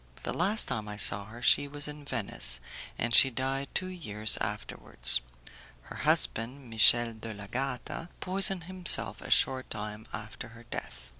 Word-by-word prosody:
The - - -4
last 200 +6 +1
time 105 -2 -5
I 105 0 -8
saw 100 -1 +6
her 115 +3 -13
she 145 - +2
was 145 +1 -3
in 150 0 -10
Venice, 120 -7 -2 0.4
and 120 0 -3
she 135 - +7
died 135 +2 -4
two 185 - -1
years 110 - -3
afterwards. 60 0 0 0.6
Her - - -12
husband, 125 +2 -1
Michel 115 +2 +6
de 110 0 -10
l'Agata, 125 - -6
poisoned 190 -1 +1
himself 185 0 +4
a - - -10
short 130 -1 +1
time 105 0 -8
after - - -9
her 120 - -15
death. 65 - -9
120 Hz, 155 wpm, -28 LUFS, 110-145 Hz, 0.6 s, she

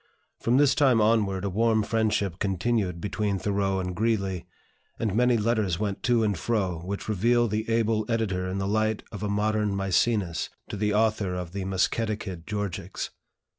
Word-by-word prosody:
From 120 +2 +2
this 140 -1 +5
time 135 -5 +4
onward 105 -3 +2
a - - 0
warm 110 +2 +2
friendship 105 -4 0
continued 95 -2 0
between 105 +2 -1
Thoreau 95 0 0
and 90 -1 -3
Greeley, 100 -5 -1 0.5
and 110 -4 -1
many 125 +2 +3
letters 105 -5 +1
went 100 -1 -2
to 120 0 +2
and 105 -2 +1
fro, 95 -3 -1
which 95 +4 -5
reveal 120 +4 +2
the 110 +1 -2
able 115 -1 +1
editor 95 -6 0
in 95 - -3
the 95 0 -1
light 110 +1 0
of 105 - -7
a 105 - -2
modern 105 0 +1
Mæcenas 95 -2 +1 0.2
to - - -4
the 105 +1 0
author 105 -3 +1
of 90 -2 -5
the 95 0 -4
Musketaquid 95 -2 -1
Georgics. 105 -3 -4
105 Hz, 170 wpm, -27 LUFS, 95-110 Hz, 0.5 s, this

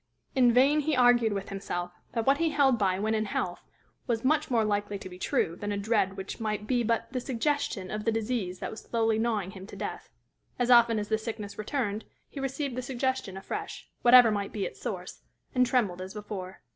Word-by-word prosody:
In 250 -3 +5
vain 270 +5 +5
he 300 0 +1
argued 245 -3 +5
with 195 -1 -3
himself 175 -3 -4 0.2
that 230 -2 -1
what 275 +2 +4
he 330 -1 +2
held 270 -6 +3
by 190 -2 +2
when 215 +3 0
in 215 0 +1
health 180 -3 -3 0.4
was 235 -1 -1
much 305 +2 +2
more 230 -4 +2
likely 205 -1 -1
to 195 - -9
be 180 0 -11
true 165 -2 0
than 205 +3 -4
a 205 - -1
dread 200 -2 +1
which 190 +4 -6
might 210 -2 -2
be 245 +2 +1
but 230 +1 -1
the 255 - 0
suggestion 255 -6 -1
of 215 0 -3
the 225 - +2
disease 220 -5 -2
that - - -5
was 220 - -8
slowly 225 -1 +1
gnawing 215 -5 0
him 190 0 -10
to - - -10
death: - - -6 0.5
as 245 0 +1
often 235 -2 +6
as 210 0 -3
the 220 0 +1
sickness 215 -3 -6
returned, 215 -2 -2 0.2
he 280 - -8
received 270 -1 -3
the 255 - -2
suggestion 255 -5 -2
afresh, 410 - -6
whatever 245 -2 +8
might 200 -1 -2
be 205 -3 -2
its - - -8
source, - - -5 0.3
and 250 -1 +3
trembled 210 -8 +1
as 190 +3 -7
before. 195 -3 -7
225 Hz, 215 wpm, -29 LUFS, 200-250 Hz, 0.5 s, whatever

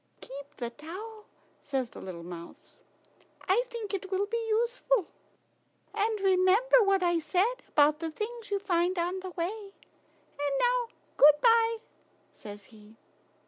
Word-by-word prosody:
"Keep 280 +2 -10
the 240 -2 -4
towel," 405 - -9 0.4
says 265 -4 -3
the - - -10
little 175 -3 -8
mouse; 170 -1 -11 0.7
"I 425 +6 +3
think 455 -4 -6
it 385 -1 -3
will 385 +1 0
be 455 +2 -3
useful. 475 -1 +1 0.9
And 430 +1 0
remember 390 +6 +4
what 395 -2 +3
I 345 -1 +2
said 390 +9 0
about 300 +1 +3
the 330 0 -3
things 440 +7 -6
you 405 - +1
find 365 -2 0
on 350 +2 -1
the 375 0 -6
way. 390 +4 -5
And 285 -1 -8
now - - +2 0.3
good 295 +1 +7
bye," 460 -1 +4 0.5
says 205 -1 -11
he. 215 0 -17
380 Hz, 140 wpm, -29 LUFS, 295-445 Hz, 0.9 s, good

